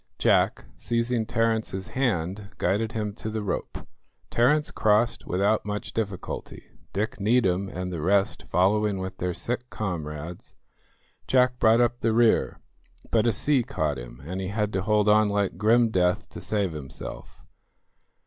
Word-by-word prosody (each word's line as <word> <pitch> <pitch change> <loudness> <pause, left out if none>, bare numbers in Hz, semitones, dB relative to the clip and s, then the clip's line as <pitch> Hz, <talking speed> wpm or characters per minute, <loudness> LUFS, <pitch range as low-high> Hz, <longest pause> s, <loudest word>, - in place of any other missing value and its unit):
Jack, - - +2
seizing 115 -1 0
Terence's 110 -4 -1
hand, 100 -5 -1
guided 105 +5 0
him 105 -2 -2
to 110 - -6
the 110 -1 -3
rope. 100 - -4 0.4
Terence 150 +6 +3
crossed 110 +2 +1
without 100 +4 +1
much 105 0 -5
difficulty, 100 -5 -5 0.2
Dick 105 +2 -2
Needham 100 -3 +2
and 90 0 -5
the 80 - -3
rest 100 +4 +1
following 100 +3 +2
with 95 0 -6
their 90 -1 -2
sick 125 +1 -2
comrades; 85 -4 -5 0.7
Jack 125 -1 +3
brought 115 +2 +5
up 120 0 +1
the 115 -2 +1
rear, 115 0 +3 0.5
but 115 0 +3
a - - +4
sea 135 +6 +2
caught 80 - -2
him, - - -10
and 90 +4 -4
he 95 - -3
had 105 +1 -1
to 95 - 0
hold 105 +1 +2
on 105 0 +5
like 100 -1 -1
grim 115 +2 +4
death 90 -1 +1
to - - -9
save 100 -4 0
himself. 65 -4 -8
105 Hz, 150 wpm, -26 LUFS, 95-115 Hz, 0.7 s, brought